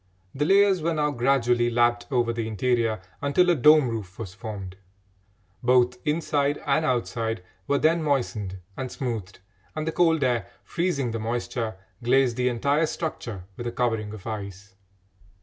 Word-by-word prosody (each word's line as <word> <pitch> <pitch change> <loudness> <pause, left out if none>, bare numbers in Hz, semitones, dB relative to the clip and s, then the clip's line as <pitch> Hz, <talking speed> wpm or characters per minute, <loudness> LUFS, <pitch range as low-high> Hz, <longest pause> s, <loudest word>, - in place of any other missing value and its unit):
The 145 +2 0
layers 195 0 +4
were 165 +1 0
now 150 -1 +1
gradually 120 -2 +2
lapped 120 0 +2
over 120 -4 +1
the 115 -1 -3
interior 110 -1 0 0.2
until 175 +6 +3
a - - +3
dome 150 0 +6
roof 105 -6 -5
was 100 -5 -6
formed. 95 -2 -7 0.9
Both 125 0 +3
inside 145 -2 +1
and 145 +2 +2
outside 115 -6 -1 0.2
were 140 - +2
then 165 +3 +3
moistened 120 -10 -1 0.2
and 130 -2 -5
smoothed, 110 -8 -4 0.4
and 155 0 -2
the - - +1
cold 165 -2 +3
air, 120 -6 +1 0.2
freezing 170 -8 -1
the 115 - -3
moisture, 115 -1 -3 0.3
glazed 125 0 +3
the 125 0 +1
entire 140 +6 +1
structure 120 - -5
with 120 - -5
a - - -2
covering 115 -4 -1
of 105 -3 -10
ice. 100 -3 -6
120 Hz, 155 wpm, -25 LUFS, 115-145 Hz, 0.9 s, dome